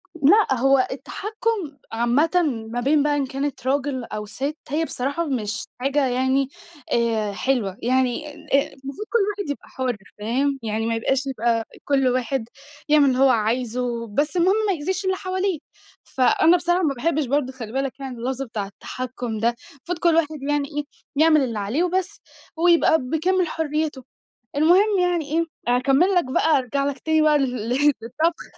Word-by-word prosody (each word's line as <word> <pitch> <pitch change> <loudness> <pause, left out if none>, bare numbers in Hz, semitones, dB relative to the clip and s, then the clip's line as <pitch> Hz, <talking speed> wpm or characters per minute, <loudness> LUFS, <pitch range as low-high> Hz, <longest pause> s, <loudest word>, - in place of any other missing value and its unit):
لأ، 355 +8 +5
هو 270 0 +4
التحكُّم 400 - -3
عامةً 240 +8 +2 0.4
ما 245 - -2
بين 285 +3 +3
بقى 295 0 +2
إن 280 - 0
كانت 270 -1 -4
راجل 270 -2 0
أو 210 -2 -5
ست، 280 +8 -4
هي 315 +4 0
بصراحة 280 +6 -2
مش 235 -4 -2
حاجة 275 +2 +1
يعني 260 +2 +1 0.4
آآ، 225 -3 +1
حلوة 210 -5 -1
يعني 255 +3 +1
آآ، 280 -1 0
المفروض 275 +10 -7
كل 470 - +2
واحد 405 -7 -4
يبقى 285 - -5
حُر، 255 -3 -2 0.2
فاهم 270 +6 0
يعني؟ 220 +1 -2
ما 230 0 0
يبقاش 265 +4 0 0.6
كل 270 -2 +2
واحد 250 -1 -1 0.4
يعمِل 300 -1 +6
اللي 255 - 0
هو 270 0 +6
عايزه، 235 +1 0
بس 290 - -1
المهم 370 +3 +4
ما 390 - +2
يأذِيش 375 +5 -3
اللي 375 0 +1
حواليه. 370 -3 -2 0.4
فأنا 320 +7 +3
بصراحة 350 +2 +1
ما 290 -4 +2
باحبش 310 +3 0
برضه، 265 0 0
خلِّ 230 -4 -8
بالك 270 0 -2
يعني، 265 -2 -6
اللفظ 255 +3 -3
بتاع 215 -5 -4
التحكُّم 245 +2 -6
ده، 235 +2 +1 0.2
المفروض 330 +5 -6
كل 335 -2 +3
واحد 310 -3 0
يعني 290 -1 +1
إيه 295 - 0 0.3
يعمِل 310 0 +5
اللي 230 -5 -2
عليه 220 - 0
وبس، 370 +2 -2 0.4
هو 350 - +3
يبقى 335 -2 +5
بكامل 345 +7 +1
حريته، 305 -3 -2 0.5
المهم 370 +7 +4
يعني 355 -3 +1
إيه، 335 +1 +2 0.2
أكمِل 270 +10 +3
لك 355 - +3
بقى، 290 +3 +2
أرجَع 270 +2 -1
لك 280 -1 -2
تاني 315 +1 +2
بقى 300 -1 +4
ل 255 -2 0
للطبخ. 285 +4 +1
275 Hz, 165 wpm, -23 LUFS, 250-320 Hz, 0.6 s, يعمِل